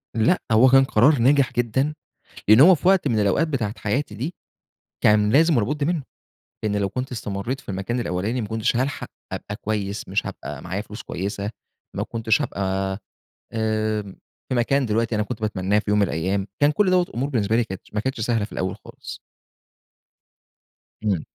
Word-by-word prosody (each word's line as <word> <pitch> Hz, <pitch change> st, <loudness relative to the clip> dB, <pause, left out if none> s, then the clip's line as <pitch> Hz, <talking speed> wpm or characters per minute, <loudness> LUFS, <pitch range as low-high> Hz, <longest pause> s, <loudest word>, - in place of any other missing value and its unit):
لأ، 115 Hz, +11 st, +3 dB
هو 110 Hz, +4 st, +6 dB
كان 135 Hz, +1 st, +7 dB
قرار 130 Hz, +5 st, +4 dB
ناجح 135 Hz, +2 st, +3 dB
جدًا 125 Hz, +5 st, 0 dB, 0.6 s
لأنّه 110 Hz, +7 st, +9 dB
هو 185 Hz, +1 st, +8 dB
في 175 Hz, -, 0 dB
وقت 190 Hz, -6 st, +4 dB
من 115 Hz, -4 st, +1 dB
الأوقات 105 Hz, -, +2 dB
بتاعة 115 Hz, -7 st, -2 dB
حياتي 110 Hz, +2 st, -2 dB
دي، 140 Hz, -, -4 dB, 0.7 s
كان 105 Hz, 0 st, +5 dB
لازم 160 Hz, +2 st, +5 dB
ولا 110 Hz, -4 st, +2 dB
بُد 150 Hz, -1 st, -1 dB
منّه، 165 Hz, -1 st, 0 dB, 0.6 s
لإن 105 Hz, -1 st, 0 dB
لو 100 Hz, -1 st, 0 dB
كنت 125 Hz, +5 st, -4 dB
استمريت 110 Hz, +3 st, -4 dB
في -, -, -25 dB
المكان 100 Hz, +5 st, -2 dB
الأولاني 110 Hz, +4 st, -2 dB
ما 105 Hz, -, -4 dB
كنتش 110 Hz, +3 st, 0 dB
هالحق 130 Hz, +3 st, -2 dB, 0.2 s
أبقى 105 Hz, -, -5 dB
كويّس، 105 Hz, -2 st, -3 dB
مش -, -, -1 dB
هابقى -, -, -7 dB
معايا 95 Hz, +3 st, -3 dB
فلوس 105 Hz, +1 st, -8 dB
كويّسة، 100 Hz, +3 st, -4 dB, 0.5 s
ما -, -, -1 dB
كنتش 110 Hz, -1 st, 0 dB
هابقى 95 Hz, 0 st, -2 dB, 0.5 s
آآ، 110 Hz, -1 st, 0 dB, 0.5 s
في -, -, -1 dB
مكان 130 Hz, +3 st, +2 dB
دلوقتي 115 Hz, +1 st, 0 dB
أنا 105 Hz, -, +1 dB
كنت 110 Hz, +1 st, -5 dB
باتمناه 105 Hz, -1 st, 0 dB
في 105 Hz, -, -2 dB
يوم 105 Hz, -, +3 dB
من 100 Hz, -, +4 dB
الأيّام، 95 Hz, +4 st, -1 dB
كان 145 Hz, 0 st, +5 dB
كل 190 Hz, +5 st, +2 dB
دوّة 185 Hz, -1 st, +4 dB
الأمور 135 Hz, -5 st, -3 dB
بالنسبة 110 Hz, -4 st, +1 dB
لي 120 Hz, -, +2 dB
كانتش 95 Hz, -1 st, -10 dB
ما 105 Hz, -, +1 dB
كانتش 130 Hz, +1 st, -3 dB
سهلة 115 Hz, -1 st, 0 dB
في 105 Hz, -, -9 dB
الأوّل 95 Hz, 0 st, -2 dB
خالص. -, -, -9 dB, 1.8 s
إمم. 95 Hz, -7 st, 0 dB
110 Hz, 180 wpm, -23 LUFS, 105-130 Hz, 1.8 s, لأنّه